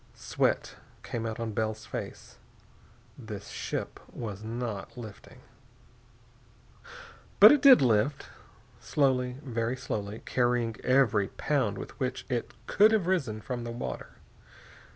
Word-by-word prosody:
Sweat - - -1 0.3
came 115 -1 -4
out 110 0 -5
on 115 -1 -3
Bell's 110 0 -2
face. - - -8 0.8
The 110 -4 -7
ship 100 - -5
was 110 -3 -6
not 115 -2 -5
lifting.... 110 -4 -11 2.0
But - - +11
it 295 -2 +4
did 265 - +8
lift. 120 +4 +1 0.5
Slowly, 125 -3 +1
very 120 -1 -2
slowly, 105 -2 -5
carrying 120 -2 +1
every 115 -7 +3
pound 120 -8 -1
with - - -9
which 130 -1 -3
it 120 -2 -3
could 210 +2 +5
have 210 -5 +2
risen 140 -13 -1
from 120 +1 -5
the 120 - -5
water. 115 +1 -6
120 Hz, 120 wpm, -29 LUFS, 110-130 Hz, 2.0 s, But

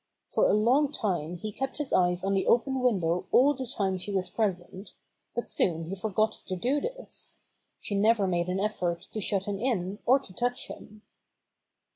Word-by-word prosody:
For - - +3
a - - +4
long 260 +7 +3
time 180 - -2
he 215 +4 -5
kept 270 +5 -4
his 295 -2 -3
eyes 180 0 +3
on 195 +1 +1
the 195 - +1
open 265 +3 +3
window 185 -8 +1
all 280 +4 +6
the 260 -2 -5
time 190 -4 -1
she 195 +3 -4
was 185 -2 -1
present, 190 -2 -3 0.4
but 240 - -2
soon 165 -1 +1
he - - -2
forgot 215 +2 +1 0.2
to 185 - -2
do 255 +10 0
this. - - -7 0.4
She - - -4
never 210 +1 +3
made 175 -2 0
an 185 +1 0
effort 180 -5 -1
to 215 - -2
shut 195 0 0
him 200 -1 -3
in 205 -5 -1
or 260 +3 +7
to 260 -9 -11
touch 245 +4 -2
him. 210 +1 -11
205 Hz, 190 wpm, -28 LUFS, 185-245 Hz, 0.4 s, or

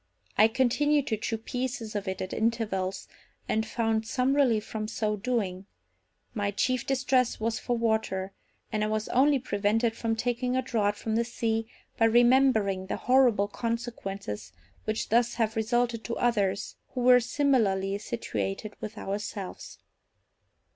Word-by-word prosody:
I 215 - +6
continued 265 +5 +2
to 220 - 0
chew 225 +1 -2
pieces 245 -1 -4
of 205 -1 -3
it 190 0 -2
at 185 - -6
intervals, 210 -5 -1 0.4
and 220 0 0
found 225 -1 0
some 255 +3 +1
relief 235 -7 +3
from 215 -1 -4
so 215 -1 -1
doing; 200 -4 -2 0.7
my 205 -3 -1
chief 255 +4 0
distress 260 -2 +1
was 225 +1 -1
for 245 -1 -1
water, 220 -4 0 0.4
and 215 -1 0
I - - +1
was 215 0 -1
only 275 +3 +4
prevented 225 -1 0
from 225 -1 -1
taking 245 +2 -1
a 260 - +1
draught 210 -5 0
from 220 +1 -2
the 235 - +3
sea 225 -1 -2 0.3
by 225 - +5
remembering 225 -5 +4
the - - -2
horrible 250 -6 +4
consequences 200 - -4 0.3
which 215 0 -2
thus 235 +1 +3
have 220 -2 0
resulted 230 +1 0
to 235 - -3
others 200 -5 0 0.2
who 250 - -1
were 250 0 +7
similarly 225 -7 +1
situated 215 -2 -4
with 215 +1 -6
ourselves. 200 -1 -5
225 Hz, 145 wpm, -28 LUFS, 205-245 Hz, 0.7 s, were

